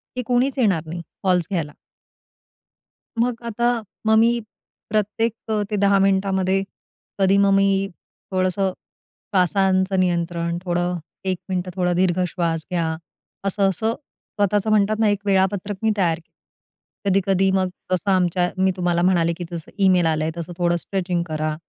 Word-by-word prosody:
की 250 Hz, -, -1 dB
कोणीच 250 Hz, +3 st, +1 dB
येणार 195 Hz, -9 st, +3 dB
नाही 170 Hz, +1 st, -5 dB, 0.2 s
कॉल्स 180 Hz, -3 st, +2 dB
घ्यायला. 160 Hz, -5 st, -1 dB, 1.5 s
मग 245 Hz, 0 st, +2 dB
आता 235 Hz, +1 st, 0 dB, 0.4 s
मग 220 Hz, 0 st, +4 dB
मी 235 Hz, +1 st, +4 dB, 0.5 s
प्रत्येक 215 Hz, +2 st, 0 dB, 0.2 s
अ, 215 Hz, -1 st, +1 dB
त्या 210 Hz, -, -1 dB
10 200 Hz, 0 st, +4 dB
मिनिटांमध्ये 190 Hz, 0 st, +2 dB, 0.6 s
कधी 195 Hz, +1 st, +4 dB
मग 200 Hz, 0 st, +4 dB
मी 195 Hz, 0 st, +3 dB, 0.4 s
थोडंसं 185 Hz, +1 st, +1 dB, 0.6 s
श्वासाचं 190 Hz, +1 st, +2 dB
नियंत्रण, 170 Hz, -1 st, 0 dB
थोडं 175 Hz, 0 st, 0 dB, 0.3 s
1 185 Hz, -1 st, 0 dB
मिनिटं 180 Hz, 0 st, -2 dB
थोडं 180 Hz, -1 st, +1 dB
दीर्घ 185 Hz, 0 st, +2 dB
श्वास 165 Hz, -3 st, -2 dB
घ्या, 170 Hz, -2 st, 0 dB, 0.6 s
असं-असं 195 Hz, +2 st, +1 dB
स्वतःचं 205 Hz, -7 st, -2 dB
म्हणतात 215 Hz, +1 st, +2 dB
ना, 220 Hz, -, +4 dB
एक 205 Hz, -1 st, +1 dB
वेळापत्रक 195 Hz, +1 st, +1 dB
मी 220 Hz, -, +3 dB
तयार 170 Hz, -3 st, +1 dB
केलं. 165 Hz, -, -28 dB, 0.7 s
कधी-कधी 195 Hz, 0 st, +2 dB
मग 190 Hz, -1 st, +1 dB, 0.2 s
तसं 185 Hz, +2 st, +1 dB
आमच्या 180 Hz, -1 st, +2 dB
मी 190 Hz, 0 st, +3 dB
तुम्हाला 175 Hz, -1 st, +1 dB
म्हणाले, 170 Hz, -2 st, +3 dB
की 175 Hz, -, -5 dB
जसं 165 Hz, -2 st, -7 dB
ईमेल 180 Hz, -3 st, +4 dB
आलंय, 160 Hz, 0 st, 0 dB
तसं 170 Hz, +1 st, -5 dB
थोडं 175 Hz, -1 st, +2 dB
स्ट्रेचिंग 180 Hz, -1 st, -2 dB
करा, 155 Hz, 0 st, -2 dB
190 Hz, 145 wpm, -22 LUFS, 175-200 Hz, 1.5 s, मग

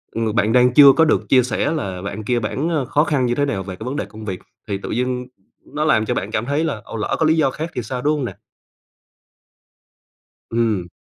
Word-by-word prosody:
ng 115 Hz, -1 st, -1 dB
bạn 110 Hz, 0 st, +2 dB
đang 125 Hz, 0 st, +4 dB
chưa 140 Hz, -1 st, +9 dB
có 160 Hz, -, +6 dB
được 155 Hz, -, +1 dB
chia 130 Hz, -2 st, +5 dB
sẻ 125 Hz, +4 st, -1 dB
là 95 Hz, -, -3 dB
bạn 100 Hz, +2 st, -5 dB
kia 120 Hz, +3 st, 0 dB
bản, 130 Hz, +8 st, -2 dB
ờ, 155 Hz, -6 st, 0 dB
khó 145 Hz, +3 st, +2 dB
khăn 145 Hz, -5 st, +1 dB
như 120 Hz, 0 st, 0 dB
thế 145 Hz, -, +1 dB
nào 115 Hz, -9 st, -2 dB
về 95 Hz, -1 st, -7 dB
cái 110 Hz, -, -9 dB
vấn 130 Hz, +3 st, -3 dB
đề -, -, -2 dB
công 110 Hz, +2 st, -11 dB
việc, 95 Hz, -3 st, -4 dB, 0.3 s
thì 100 Hz, -, -2 dB
tự 100 Hz, -, -7 dB
dưng 125 Hz, +1 st, -2 dB, 0.4 s
nó 150 Hz, +1 st, -3 dB
làm 110 Hz, -8 st, +3 dB
cho -, -, -1 dB
bạn 100 Hz, +3 st, -3 dB
cảm 110 Hz, -, -1 dB
thấy 145 Hz, +4 st, 0 dB
là 140 Hz, -10 st, -2 dB
ồ, -, -, -8 dB
lỡ 105 Hz, -, -1 dB
có 160 Hz, -, +3 dB
lý 160 Hz, +1 st, +3 dB
do 140 Hz, -4 st, +2 dB
khác 160 Hz, +4 st, -5 dB
thì 125 Hz, -, -2 dB
sao, 125 Hz, +3 st, -4 dB
đúng 150 Hz, +3 st, +2 dB
hông 140 Hz, -, -2 dB
nè? -, -, -5 dB, 2.2 s
Ừm. 110 Hz, -6 st, 0 dB
125 Hz, 250 wpm, -20 LUFS, 110-145 Hz, 2.2 s, chưa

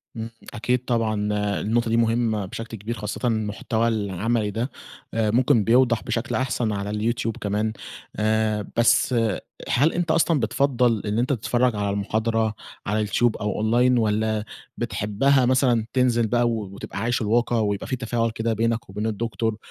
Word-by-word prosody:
امم، 115 Hz, 0 st, -5 dB, 0.2 s
أكيد 125 Hz, +2 st, -1 dB
طبعًا 115 Hz, -3 st, +1 dB, 0.5 s
النقطة 115 Hz, +2 st, 0 dB
دي 115 Hz, -, +2 dB
مهمة 115 Hz, -2 st, +1 dB
بشكل 115 Hz, +4 st, -7 dB
كبير 110 Hz, +4 st, -4 dB
خاصةً 105 Hz, +4 st, -3 dB
المحتوى 110 Hz, +1 st, 0 dB
العملي 105 Hz, +1 st, 0 dB
ده 115 Hz, +6 st, -3 dB, 0.4 s
آآ 110 Hz, -2 st, +1 dB
ممكن 120 Hz, -2 st, +3 dB
بيوضح 120 Hz, +1 st, +3 dB
بشكل 120 Hz, 0 st, -2 dB
أحسن 125 Hz, -3 st, 0 dB
على 100 Hz, 0 st, -3 dB
اليوتيوب 115 Hz, +2 st, -1 dB
كمان، 105 Hz, +2 st, -1 dB, 0.4 s
آآ 110 Hz, -1 st, 0 dB
بس 120 Hz, +2 st, +4 dB, 0.5 s
هل 145 Hz, +6 st, +3 dB
أنتَ 175 Hz, -2 st, 0 dB
أصلًا 165 Hz, -1 st, +3 dB
بتفضَّل 120 Hz, -1 st, +1 dB
إن 105 Hz, +2 st, 0 dB
أنتَ 125 Hz, -, 0 dB
تتفرج 125 Hz, 0 st, +1 dB
على 100 Hz, -1 st, -1 dB
المحاضرة 110 Hz, +2 st, 0 dB, 0.3 s
على 105 Hz, +2 st, 0 dB
اليوتيوب، 110 Hz, +3 st, +1 dB
أو 105 Hz, 0 st, -2 dB
online 120 Hz, +2 st, +3 dB
والَّا 110 Hz, 0 st, 0 dB, 0.3 s
بتحبها 120 Hz, +5 st, +1 dB
مثلًا 125 Hz, -3 st, +3 dB
تنزل 120 Hz, -3 st, +2 dB
بقى 120 Hz, +1 st, +2 dB
و -, -, 0 dB, 0.2 s
وتبقى 100 Hz, 0 st, -7 dB
عايش 120 Hz, +3 st, 0 dB
الواقع، 115 Hz, +2 st, +1 dB
ويبقى 100 Hz, -2 st, -1 dB
في 130 Hz, -, -1 dB
تفاعل 115 Hz, -1 st, -1 dB
كده 115 Hz, +1 st, -1 dB
بينك 115 Hz, 0 st, -1 dB
وبين 105 Hz, +3 st, -3 dB
الدكتور، 110 Hz, 0 st, -2 dB
115 Hz, 155 wpm, -24 LUFS, 105-120 Hz, 0.5 s, بس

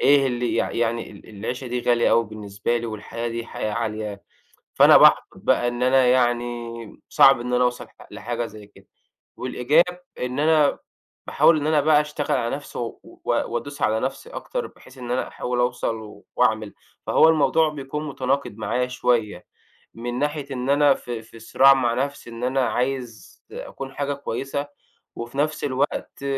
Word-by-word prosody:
إيه 140 Hz, -1 st, +5 dB
اللي 120 Hz, -1 st, -1 dB
يع -, -, 0 dB
يعني 115 Hz, 0 st, -1 dB
ال 100 Hz, -, -15 dB
العيشة 115 Hz, +5 st, -5 dB
دي 125 Hz, 0 st, -2 dB
غالية 120 Hz, 0 st, +2 dB
أوي 115 Hz, 0 st, +4 dB
بالنسبة 105 Hz, +2 st, -3 dB
لي، 120 Hz, -, -3 dB
والحياة 115 Hz, +2 st, -5 dB
دي 115 Hz, 0 st, -5 dB
حياة 110 Hz, -, -4 dB
عالية 105 Hz, -2 st, -4 dB, 0.5 s
فأنا -, -, +7 dB
بأُحبَط -, -, +6 dB
بقى 120 Hz, -, +1 dB
إن 120 Hz, +1 st, -4 dB
أنا 130 Hz, 0 st, +4 dB
يعني 120 Hz, -2 st, -1 dB
صعب 135 Hz, -3 st, +6 dB
إن 125 Hz, +1 st, -4 dB
أنا 125 Hz, -, +3 dB
أوصَل 125 Hz, 0 st, -1 dB
لح -, -, -18 dB
لحاجة 120 Hz, 0 st, -4 dB
زي 105 Hz, -1 st, -12 dB
كده، 105 Hz, -, -21 dB, 0.5 s
والإيجاب 160 Hz, +8 st, +1 dB, 0.2 s
إن 125 Hz, +3 st, -2 dB
أنا 155 Hz, -2 st, +3 dB, 0.5 s
باحاول 165 Hz, -, +4 dB
إن 145 Hz, -, -2 dB
أنا 155 Hz, -1 st, +3 dB
بقى 150 Hz, 0 st, +4 dB
أشتغل 150 Hz, -1 st, -2 dB
على 120 Hz, +2 st, -1 dB
نفسي 145 Hz, -, -9 dB
و 120 Hz, -1 st, -5 dB
و -, -, -16 dB, 0.2 s
وأدوس 140 Hz, +4 st, -3 dB
على 110 Hz, +1 st, +2 dB
نَفْسي 135 Hz, -, -4 dB
أكتر -, -, -4 dB
بحيث 130 Hz, -, -17 dB
إن 120 Hz, -1 st, -7 dB
أنا 125 Hz, -, -1 dB
أحاول 125 Hz, 0 st, -3 dB
أوصَل 115 Hz, -4 st, -3 dB
وأعمل، 110 Hz, -4 st, +1 dB, 0.3 s
فهو 160 Hz, -, +5 dB
الموضوع 160 Hz, 0 st, +3 dB
بيكون 150 Hz, +1 st, -5 dB
متناقض 135 Hz, -4 st, -2 dB
معايا 115 Hz, +4 st, -1 dB
شوية 115 Hz, -7 st, -1 dB, 0.5 s
من 120 Hz, +1 st, -5 dB
ناحية 150 Hz, -1 st, -2 dB
إن 130 Hz, 0 st, -3 dB
أنا 145 Hz, -1 st, +5 dB
ف 125 Hz, -, -11 dB
في 115 Hz, -1 st, -7 dB
صراع 135 Hz, +4 st, +5 dB
مع 120 Hz, -3 st, +1 dB
نَفْسي 140 Hz, -1 st, -3 dB
إن 115 Hz, +1 st, -6 dB
أنا 130 Hz, +1 st, +1 dB
عايز 125 Hz, -1 st, -3 dB
أكُون 135 Hz, 0 st, -8 dB
حاجة 145 Hz, 0 st, -2 dB
كويسة 140 Hz, +1 st, -4 dB, 0.5 s
وفي 120 Hz, +4 st, -7 dB
نَفْس 150 Hz, +1 st, 0 dB
الوقت 135 Hz, 0 st, -2 dB
125 Hz, 170 wpm, -23 LUFS, 115-140 Hz, 0.5 s, فأنا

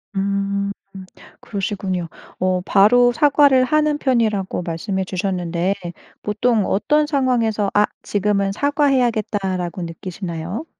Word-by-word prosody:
음 200 Hz, 0 st, -1 dB, 0.7 s
그러시군요. 195 Hz, -4 st, -3 dB, 0.3 s
어 185 Hz, 0 st, +1 dB
바로 245 Hz, +6 st, +5 dB
사과를 280 Hz, -2 st, +4 dB
하는 305 Hz, +1 st, +1 dB
편이라고 220 Hz, -10 st, 0 dB
말씀해 190 Hz, +3 st, -3 dB
주셨는데 180 Hz, -1 st, -1 dB, 0.5 s
보통 215 Hz, 0 st, +1 dB
어떤 300 Hz, +9 st, +2 dB
상황에서 240 Hz, -8 st, +1 dB
'아 210 Hz, 0 st, +4 dB, 0.2 s
지금은 200 Hz, -1 st, 0 dB
사과해야겠다.'라고 215 Hz, -, 0 dB
느끼시나요? 175 Hz, -, -6 dB
200 Hz, 280 characters per minute, -20 LUFS, 185-245 Hz, 0.7 s, 바로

